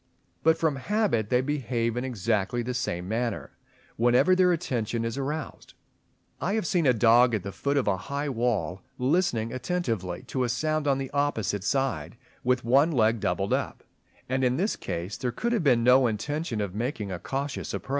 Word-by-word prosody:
But 160 0 +4
from 160 -4 0
habit 185 - 0
they 125 0 +3
behave 125 -5 -1
in 125 - -2
exactly 115 -1 -1
the 125 +2 -3
same 90 -7 -3
manner 115 +1 -2 0.5
whenever 120 +10 +4
their 185 -1 +4
attention 120 -8 -1
is 115 - -2
aroused 145 +2 -5
(fig. - - -42
4). - - -1
I - - 0
have 220 - -1
seen 170 -2 +1
a 130 - +6
dog 120 +2 +5
at 100 - -3
the 100 - -5
foot 140 +9 -1
of 135 - +1
a 95 -2 +2
high 140 +8 -4
wall, 115 -7 -1 0.2
listening 125 -5 +1
attentively 115 - -2
to 130 - -2
a 120 - 0
sound 155 +4 0
on 135 -1 +3
the 135 -1 -4
opposite 125 -9 0
side, 100 - -1 0.3
with 125 0 +1
one 135 +7 +4
leg 115 -4 +2
doubled - - -1
up; - - -2 0.4
and 130 +1 0
in 125 0 +2
this 200 +6 0
case 85 +4 -5
there 125 -2 -2
could 235 - -2
have 225 -7 +1
been 125 -5 +4
no 125 +1 +6
intention 120 +2 -2
of 100 -3 -3
making 110 -2 -3
a 90 - -4
cautious 140 +7 -4
approach. - - -6
125 Hz, 195 wpm, -27 LUFS, 110-145 Hz, 0.5 s, a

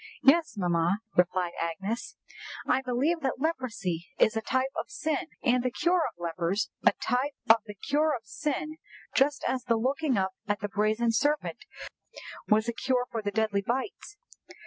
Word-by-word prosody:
"Yes, 315 +2 +5
mamma," 175 0 +2 0.2
replied 180 0 +2
Agnes. 195 +7 -3 0.5
"I 260 - +2
believe 265 +7 +1
that 265 -4 -2
leprosy 230 - -2
is 220 - +4
a 225 - 0
type 260 +4 0
of - - -3
sin, 310 +2 -2 0.2
and 250 -1 +3
the 255 - 0
cure 350 +8 +2
of 225 - -10
lepers 170 +4 -1
a - - +6
type 265 +3 -1
of 225 - +8
the 210 - -8
cure 295 +8 +1
of 225 -2 -8
sin 300 +8 -3 0.4
just 285 +1 +2
as 255 -1 -1
the 230 -2 +2
looking 265 +2 +1
up 190 0 +1 0.2
at 205 -1 0
the 205 - -3
brazen 215 +3 +1
serpent 290 +6 0 0.8
was 215 +1 +3
a 235 - 0
cure 250 +1 0
for 225 - -2
the 205 - -1
deadly 215 -1 +1
bites." 260 - -3
235 Hz, 170 wpm, -29 LUFS, 205-275 Hz, 0.8 s, of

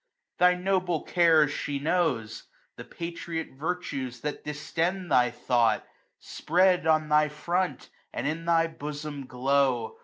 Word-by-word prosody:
Thy 180 0 +5
noble 180 -3 0
cares 160 -4 +4
she 145 -1 -3
knows. 140 -8 -1 0.3
The - - -9
patriot 170 -1 -5
virtues 135 -5 -4
that 150 0 -4
distend 170 +5 -2
thy 125 -1 +4
thought, 120 -2 +1 0.3
Spread 180 -1 +1
on 155 -1 +3
thy 150 0 +3
front, 175 +5 -2 0.2
and - - -4
in 160 +3 -2
thy 165 -1 +3
bosom 150 -3 -6
glow. 130 -2 0
155 Hz, 125 wpm, -27 LUFS, 140-175 Hz, 0.3 s, Thy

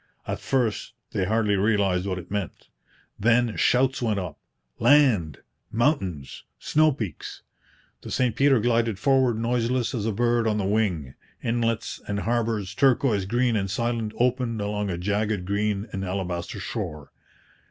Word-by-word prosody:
At - - -3
first 120 -4 -1 0.2
they 100 -4 0
hardly 105 0 +1
realized 100 -2 +1
what 95 -1 -2
it 90 0 -9
meant. 100 -3 -4 0.5
Then 120 +1 +3
shouts 130 +1 +2
went 110 -4 0
up 90 -6 -5 0.4
'Land!' 125 - +4 0.3
'Mountains!' 100 - -1
'Snow 155 0 +3
peaks!' 110 - -6 0.6
The - - -9
St 125 -3 0
Peter 135 -2 +4
glided 115 -2 +1
forward 130 -1 +2
noiseless 120 +2 0
as 110 -3 -2
a - - +1
bird 120 +1 +1
on 105 -1 +1
the 100 - -1
wing. 95 -10 0 0.3
Inlets 115 -1 -1
and 100 0 -2
harbours, 115 -4 -1
turquoise 125 -7 +2
green 120 +3 +1
and 100 -2 -1
silent, 115 +1 -2
opened 125 -2 0
along 105 0 -2
a 85 - -2
jagged, 105 +1 -1
green 100 +1 -1
and 95 - -3
alabaster 90 -2 -3
shore. 75 -3 -5
110 Hz, 145 wpm, -25 LUFS, 100-120 Hz, 0.6 s, Land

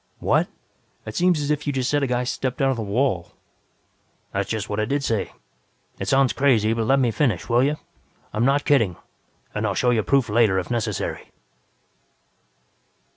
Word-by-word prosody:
"What? - - +1 0.6
It 110 - -6
seems 175 -2 +3
as 145 0 -1
if 150 0 -2
you 145 - 0
just 130 -2 -1
said 145 +1 +1
a 140 - +1
guy 125 0 0
stepped 125 0 -3
out 135 -1 +3
of - - -1
the 115 - -4
wall." 105 -4 -1 1.0
"That's 100 0 -2
just 110 -2 -2
what 105 - -3
I 110 - +1
did 140 +5 -1
say. 115 -6 -1 0.7
It - - -4
sounds 135 -2 +3
crazy, 115 -6 +3
but 115 -1 -1
let 135 +1 +4
me 125 -3 +2
finish, 125 0 0
will 120 0 +3
you? 145 +2 +1 0.6
I'm 105 +2 0
not 140 +3 +2
kidding, 115 -11 +3 0.6
and 110 +1 -1
I'll 100 - -1
show 125 +4 +2
you 115 -2 +2
proof 135 +3 +2
later 105 -3 +3
if 95 +5 -3
necessary. 110 -5 -3
120 Hz, 185 wpm, -23 LUFS, 110-140 Hz, 1.0 s, let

